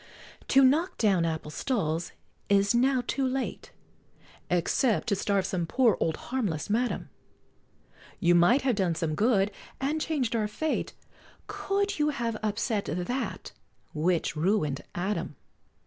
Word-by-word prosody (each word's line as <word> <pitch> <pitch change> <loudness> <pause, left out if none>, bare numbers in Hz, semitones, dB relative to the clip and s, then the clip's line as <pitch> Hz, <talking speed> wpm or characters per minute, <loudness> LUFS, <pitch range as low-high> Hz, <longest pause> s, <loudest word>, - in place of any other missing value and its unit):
To 270 0 +5
knock 305 +8 +3
down 195 -6 +3
apple 160 -2 -3
stalls 170 - -1 0.4
is 200 +1 +4
now 255 +1 +3
too 275 - -1
late, 260 0 -2 0.8
Except 205 +8 +1
to 200 - +2
starve 195 -1 0
some 175 -3 -2
poor 240 +1 +3
old 160 - 0 0.2
harmless 205 - -1
madam; 240 +3 -1 1.1
You 175 0 +4
might 175 +11 +5
have 260 -2 +2
done 185 -5 0
some 160 -1 -1
good, 205 +2 +2 0.3
and 295 +4 -1
chang'd 270 -8 -1
our 215 -2 +1
fate, 310 +9 -2 0.5
Could 400 -2 -2
you 300 0 +3
have 235 -6 -2
upset 210 0 -1
that, 180 - -3 0.4
which 165 +1 0
ruined 155 -4 0
Adam! 190 +4 -2
210 Hz, 130 wpm, -28 LUFS, 175-260 Hz, 1.1 s, To